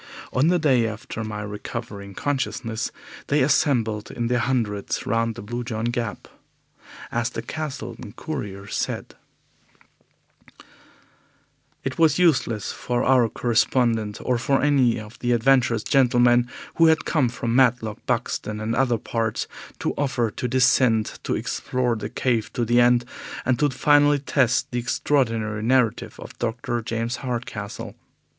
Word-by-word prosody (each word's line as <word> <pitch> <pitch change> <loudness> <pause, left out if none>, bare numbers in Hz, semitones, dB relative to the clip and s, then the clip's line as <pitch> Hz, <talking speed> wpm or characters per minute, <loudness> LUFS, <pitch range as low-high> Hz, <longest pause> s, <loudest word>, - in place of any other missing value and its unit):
On 130 +5 +3
the 180 +1 +4
day 130 -8 +3
after 110 +1 -6
my 105 -1 -5
recovering 105 -1 -7
consciousness 130 -5 -2 0.4
they 145 -1 +3
assembled 120 -6 +1
in 120 -1 -3
their 125 0 +2
hundreds 115 -5 -1
round 115 +1 0
the - - -8
Blue 120 +3 -4
John 115 -2 -3
Gap. 120 -3 -3 0.8
As 120 0 0
the 115 - -6
Castleton 130 -7 -6
Courier 105 -10 -6
said: 100 - -3 2.7
"It - - -4
was 160 -2 +4
useless 130 - +2
for 120 -1 -2
our 125 -3 +4
correspondent, 115 -2 +1
or 125 -2 +1
for 135 +3 +1
any 135 -5 +3
of 105 +1 -11
the 120 0 +1
adventurous 120 -2 +3
gentlemen 120 -2 +4 0.3
who 165 - +6
had 160 -1 +3
come 140 -7 +2
from 115 -1 -2
Matlock, 120 -4 +2
Buxton, 115 -3 -2
and 110 +1 -2
other 125 -2 +2
parts, 115 0 -2 0.3
to - - -2
offer 130 -6 0
to 125 - -3
descend, 125 -3 +3
to - - 0
explore 125 -2 -1
the 110 - -5
cave 115 -4 0
to 120 -3 0
the 120 +2 +4
end, 120 0 +4 0.4
and 125 -1 +1
to 145 - +3
finally 145 +2 +4
test 135 -3 +1
the 120 - -1
extraordinary 115 -4 0
narrative 120 -1 +1
of - - -10
Dr. 120 0 -2
James 115 +1 -2
Hardcastle. 120 -5 -5
120 Hz, 140 wpm, -24 LUFS, 115-130 Hz, 2.7 s, who